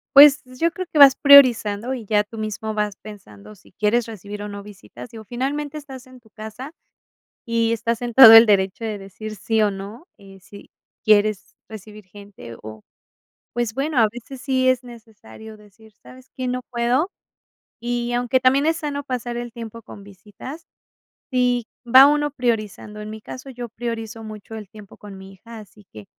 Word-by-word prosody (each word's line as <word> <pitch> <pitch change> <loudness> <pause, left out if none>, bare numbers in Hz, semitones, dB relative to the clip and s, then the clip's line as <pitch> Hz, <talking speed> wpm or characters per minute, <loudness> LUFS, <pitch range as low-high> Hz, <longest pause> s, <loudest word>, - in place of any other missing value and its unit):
Pues, 290 +1 +8
yo 255 +6 -2
creo 370 +2 -7
que 300 - +1
vas 275 -2 +9
priorizando, 250 -4 +5
y 235 -4 -9
ya 210 0 +1
tú 220 +2 -13
mismo 215 0 -5
vas 210 -2 -2
pensando 205 - -14
si 195 - -23
quieres 220 +3 0
recibir, 205 -1 -9
o, 210 - -6
no 200 0 -8
visitas, 210 +3 -13
digo, 225 -2 -11
finalmente 275 +6 -4
estás 270 -3 -12
en 255 0 -16
tu 230 -2 -25
casa, 220 +7 -10 0.7
y 230 0 0
estás 230 0 -2
en 240 -1 -5
todo 235 -3 +10
el 225 +1 +9
derecho 195 +2 +1
de 215 -2 -3
decir 215 +3 -9
sí, 220 +2 -1
o, 205 -1 +1
no, 205 - -10
eh, 195 -1 -16
si 200 +2 -15 0.3
quieres 215 -1 +1
recibir 215 -1 -12
gente, 200 - -13
o, 110 0 -11 0.7
pues 240 -2 -2
bueno, 280 +2 -3
a 225 - +5
veces 245 +3 -11
sí 260 0 0
es 255 -1 0
necesario 220 - -14
decir, 210 +1 -20
¿sabes 260 0 -16
qué? 255 -1 -3
No 250 0 -3
puedo. 250 +8 0 0.7
Y 240 0 -3
aunque 245 +1 +1
también 260 +3 +2
es 325 0 +1
sano 290 -3 -4
pasar 245 -3 -5
el 240 0 -6
tiempo 230 0 -9
con 205 -2 -13
visitas, 205 - -12 0.7
si 245 -2 0 0.2
va 255 +3 +7
uno 295 +1 +2
priorizando. 215 -5 -4
En 210 - -8
mi 220 0 -9
caso, 260 +4 -10
yo 245 -2 -8
priorizo 225 -1 -6
mucho 215 0 -11
el 215 -3 -9
tiempo 210 -1 -15
con 205 -2 -12
mi 190 0 -13
hija, 225 +4 -13
así 210 -1 -16
que 105 -1 -12
225 Hz, 185 wpm, -21 LUFS, 210-255 Hz, 0.7 s, todo